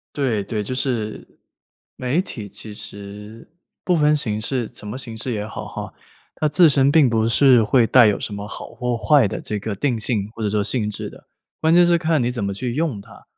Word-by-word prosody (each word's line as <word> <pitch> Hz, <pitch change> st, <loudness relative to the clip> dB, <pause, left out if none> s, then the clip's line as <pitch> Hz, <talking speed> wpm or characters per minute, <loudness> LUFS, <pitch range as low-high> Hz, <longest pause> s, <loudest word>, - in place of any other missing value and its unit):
对， 120 Hz, -8 st, 0 dB
对， 105 Hz, +1 st, -3 dB
就 130 Hz, +5 st, -4 dB
是， 120 Hz, -5 st, -3 dB, 0.6 s
媒 130 Hz, +7 st, 0 dB
体 115 Hz, -, -7 dB
其 105 Hz, +2 st, -8 dB
实 105 Hz, +1 st, -10 dB, 0.4 s
不 180 Hz, -, +2 dB
分 150 Hz, -1 st, +4 dB
形 110 Hz, -6 st, -2 dB
式， 120 Hz, +1 st, -2 dB
什 105 Hz, -, -9 dB
么 115 Hz, +6 st, -5 dB
形 115 Hz, -4 st, -6 dB
式 125 Hz, +3 st, -4 dB
也 105 Hz, -2 st, -3 dB
好 -, -, -7 dB
哈， -, -, -7 dB, 0.4 s
它 155 Hz, -, 0 dB
自 170 Hz, +2 st, +6 dB
身 135 Hz, -1 st, +3 dB
并 145 Hz, -3 st, +5 dB
不 115 Hz, -1 st, +1 dB
是 125 Hz, -1 st, +5 dB
会 115 Hz, +2 st, +3 dB
带 120 Hz, 0 st, +6 dB
有 105 Hz, -, +1 dB
什 105 Hz, -, -5 dB
么 100 Hz, +1 st, -6 dB
好 -, -, -7 dB
或 125 Hz, -2 st, -2 dB
坏 140 Hz, -4 st, +4 dB
的 -, -, -5 dB
这 105 Hz, -, -3 dB
个 110 Hz, -, -4 dB
定 120 Hz, +2 st, -1 dB
性 105 Hz, -2 st, -1 dB
或 115 Hz, -, -7 dB
者 105 Hz, -, 0 dB
说 105 Hz, 0 st, 0 dB
性 105 Hz, -3 st, -1 dB
质 105 Hz, -, -5 dB
的， -, -, -15 dB, 0.3 s
关 160 Hz, 0 st, +3 dB
键 175 Hz, 0 st, +6 dB
是 175 Hz, -, +4 dB
看 165 Hz, -3 st, +1 dB
你 120 Hz, -, +1 dB
怎 120 Hz, -5 st, -3 dB
么 100 Hz, -, -2 dB
去 120 Hz, +4 st, -4 dB
用 150 Hz, -9 st, -1 dB
它。 -, -, -16 dB
115 Hz, 240 characters per minute, -21 LUFS, 105-140 Hz, 0.6 s, 自